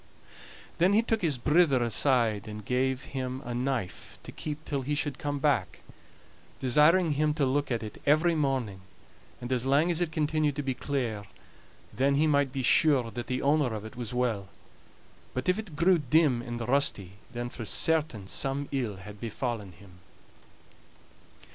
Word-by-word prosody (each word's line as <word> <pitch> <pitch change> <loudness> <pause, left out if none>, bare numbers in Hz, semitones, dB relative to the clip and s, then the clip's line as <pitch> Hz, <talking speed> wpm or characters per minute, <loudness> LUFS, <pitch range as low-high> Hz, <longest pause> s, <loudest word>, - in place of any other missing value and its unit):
Then 180 +4 +4
he 220 +2 +4
took 225 -1 0
his 155 -7 +1
brither 145 -1 +3
aside, 115 -2 +2
and 105 -1 -8
gave 130 +2 0
him 130 -1 -3
a 120 - -4
knife 125 -5 -3
to - - -9
keep 155 0 -6
till 140 -2 -2
he 145 +3 -2
should 145 -2 -2
come 145 0 -2
back, 120 - 0 0.8
desiring 150 +7 +4
him 150 +1 +1
to 145 -3 +1
look 140 +2 0
at 115 -3 -2
it 105 - -9
every 155 +4 +4
morning, 130 -10 -1 0.6
and 120 +1 -6
as 125 -2 0
lang 145 +6 +3
as 170 0 -1
it 170 -2 0
continued 155 -1 0
to 145 - -3
be 135 -1 -1
clear, 120 -6 -3 0.7
then 135 +5 +2
he 150 +3 +3
might 145 -3 +2
be 135 -1 -3
sure 130 -3 +4
that 120 0 -6
the 125 - -2
owner 140 -4 +2
of 105 0 -6
it 110 - -10
was 120 -3 -5
well; 120 -6 -1 0.9
but 130 - -3
if 180 +3 +2
it 200 -8 -8
grew 175 +3 +4
dim 145 -3 +2
and 120 -1 -5
rusty, 100 -8 0
then 120 0 -4
for 120 - -7
certain 150 -3 +1
some 135 +7 -2
ill 125 -7 -2
had 100 +2 -11
befallen 115 -3 -4
him. 90 +1 -17
135 Hz, 175 wpm, -28 LUFS, 120-150 Hz, 0.9 s, Then